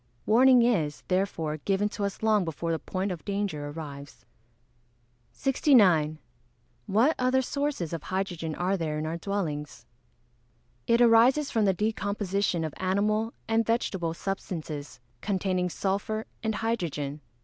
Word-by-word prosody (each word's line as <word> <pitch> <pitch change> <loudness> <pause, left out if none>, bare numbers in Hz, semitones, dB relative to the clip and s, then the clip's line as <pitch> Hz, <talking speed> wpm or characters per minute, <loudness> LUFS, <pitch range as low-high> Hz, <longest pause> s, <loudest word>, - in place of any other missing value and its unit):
Warning 250 +2 +6
is, 165 -12 +1
therefore, 175 -5 0
given 195 +6 0
to 205 - -5
us 200 +2 -5
long 215 -3 +3
before 165 0 -3
the 165 - -1
point 190 +1 -3
of 175 -3 -6
danger 200 -8 -2
arrives. 145 -2 -9 1.1
69. 195 - +3 0.7
What 230 +10 +3
other 255 +1 +2
sources 280 - -2
of 165 - -3
hydrogen 175 -4 -3
are 185 +2 0
there 160 -4 -2
in 155 - -2
our 160 +2 -3
dwellings? 165 -6 -4 1.0
It 235 +1 +4
arises 240 +5 +5
from 220 -3 +2
the 195 - +3
decomposition 200 -3 -1
of 155 -3 -3
animal 210 +4 0
and 225 0 +2
vegetable 190 -7 -1
substances, 155 -7 -5 0.2
containing 185 -2 0
sulphur 205 +4 -2 0.2
and 220 -1 -1
hydrogen. 155 -10 -2
195 Hz, 130 wpm, -28 LUFS, 165-220 Hz, 1.1 s, Warning